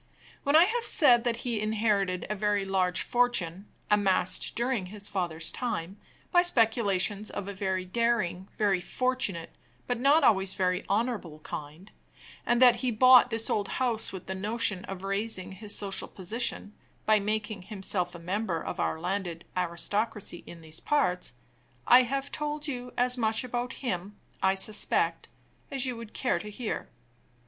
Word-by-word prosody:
When 285 +1 +1
I 325 - +9
have 460 +5 0
said 245 - +4
that 235 -1 -1
he 230 -4 -1
inherited 210 -4 0
a - - -2
very 205 -1 0
large 185 -2 +1
fortune, 210 -7 0 0.2
amassed 190 -3 +2
during 235 -5 -1
his 205 +1 -3
father's 165 -4 -2
time, 195 -6 -4 0.3
by 350 - +6
speculations 215 - +2
of 200 -1 -5
a 200 - -5
very 190 -1 -2
daring, 205 -3 0
very 200 -4 +2
fortunate, 250 -6 -1 0.3
but 245 -1 -2
not 285 +5 +4
always 190 -5 +3
very 180 0 0
honorable 205 -7 -1
kind, 155 +7 -8 0.6
and 240 0 +3
that 245 -2 +7
he 250 +2 -1
bought 250 +2 +7
this 225 -1 0
old 205 -2 0
house 240 -4 +1
with 190 -2 -8
the 190 - -4
notion 205 -1 0
of 190 -1 -7
raising 195 -1 0
his 205 +2 -3
social 195 -2 -2
position, 210 +2 -4 0.3
by 215 -1 +4
making 210 0 -2
himself 185 -2 -1
a - - -6
member 180 +1 -2
of - - -6
our 160 - -1
landed 175 -1 -3
aristocracy 185 +2 -2
in 170 -1 -11
these 160 0 -6
parts, 180 - 0 0.5
I 250 +1 +8
have 275 +3 -3
told 300 0 -3
you 250 -3 -5
as 250 +1 +3
much 220 0 +1
about 245 0 -3
him, 200 -2 -3 0.3
I 190 0 +3
suspect, 205 +2 +1 0.4
as 270 -3 -2
you 255 -2 -3
would 230 -2 -10
care 255 - 0
to 210 - -7
hear. 215 +1 -5
210 Hz, 160 wpm, -28 LUFS, 185-240 Hz, 0.6 s, I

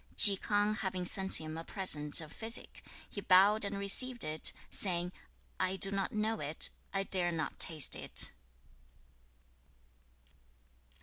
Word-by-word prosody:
2. 200 -2 +11
Chi - - -14
K'ang 210 0 -2
having 185 -2 -6
sent 190 +1 +3
him 155 0 -9
a - - -10
present 150 -6 0
of 155 -1 -13
physic, 225 +2 -3 0.3
he 200 - -10
bowed 200 +3 +2
and 200 0 -6
received 240 +5 +1
it, 155 +1 0 0.2
saying, 175 -2 -1 0.5
'I 185 0 -3
do 195 +1 +3
not 195 -1 -5
know 215 +1 -4
it. 150 +2 +1 0.2
I 195 0 -4
dare 180 -3 -3
not 160 -3 -7
taste 155 -3 +3
it.' - - +1
190 Hz, 140 wpm, -30 LUFS, 170-205 Hz, 0.5 s, 2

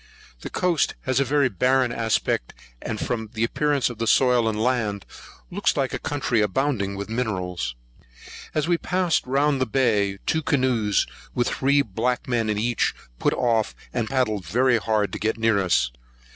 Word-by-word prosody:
The - - -7
coast 175 -4 +1
has 130 0 0
a - - +4
very 140 +1 +2
barren 130 +4 +2
aspect; 110 - -1 0.3
and, 110 -2 -4
from 110 -3 -3
the 110 0 -1
appearance 145 +3 +1
of 120 -3 -6
the 115 - -1
soil 125 -3 +4
and 105 -1 -3
land, 110 -5 0 0.5
looks - - 0
like - - 0
a - - -2
country 135 -6 0
abounding 105 -2 0
with 100 +1 -5
minerals. 90 - -3 0.8
As 155 0 +1
we 170 -1 +2
passed 180 -6 0
round 140 +1 +2
the 130 - +1
bay, 105 -6 +1
two 160 - +1
canoes, 125 -8 +1 0.3
with 120 - +1
three 140 +1 +2
black 120 +4 -2
men 115 -3 0
in 105 - 0
each, 115 +2 0 0.2
put - - +1
off, 115 -3 +1 0.2
and 115 -3 -1
paddled 115 -7 0
very 120 +8 +2
hard 105 -1 0
to - - -4
get 110 +1 0
near 110 -2 +2
us. 90 -9 +2
120 Hz, 170 wpm, -24 LUFS, 105-130 Hz, 0.8 s, a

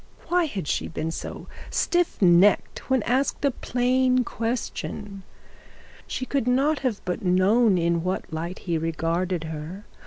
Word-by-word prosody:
Why 355 -1 +3
had 200 - -4
she - - -1
been 160 0 -3
so - - -6 0.2
stiff 350 -1 +1
necked 180 +8 +4
when 260 -4 +2
asked 265 +4 0
a 280 - +3
plain 255 +1 +1
question? 215 -4 -4 0.9
She 255 - -3
could 270 -2 -1
not 275 +5 +2 0.2
but 180 - 0
have - - -14
known 190 +4 +4
in 170 0 +1
what 185 -3 -3
light 170 +3 -4
he 170 -3 0
regarded 165 +2 -1
her. 160 +5 -7
200 Hz, 145 wpm, -25 LUFS, 170-255 Hz, 0.9 s, necked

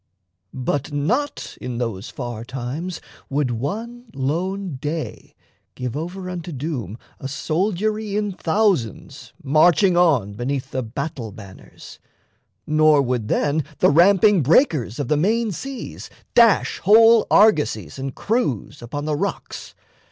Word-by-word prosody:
But 140 +3 -2
not 220 - -2
in 125 -2 -4
those 115 -5 -4
far 120 -3 -6
times 135 +8 -5 0.3
Would 140 -2 0
one 225 - -4
lone 170 +5 -2
day 150 +3 -5 0.4
give 125 -1 -4
over 180 +5 -5
unto 180 -2 -6
doom 130 - -4 0.2
A 135 - -5
soldiery 205 +8 -1
in 210 -1 -1
thousands 180 - -1
marching 170 +5 +4
on 145 - +3
Beneath 130 +4 -3
the 130 - -2
battle 125 0 -5
banners, 100 -2 -13 0.7
nor 155 -1 +4
would 125 -4 -2
then 150 +6 +1
The - - +4
ramping 190 +4 +5
breakers 145 - +2
of 145 -4 -3
the 150 - +2
main 220 +7 +1
seas 270 +8 -7 0.2
dash 230 -3 +4
Whole 225 +3 +6
argosies 145 - +3
and 135 0 -5
crews 205 - -2
upon 145 +5 -5
the 155 -1 0
rocks. - - -5
155 Hz, 125 wpm, -21 LUFS, 125-195 Hz, 0.7 s, Whole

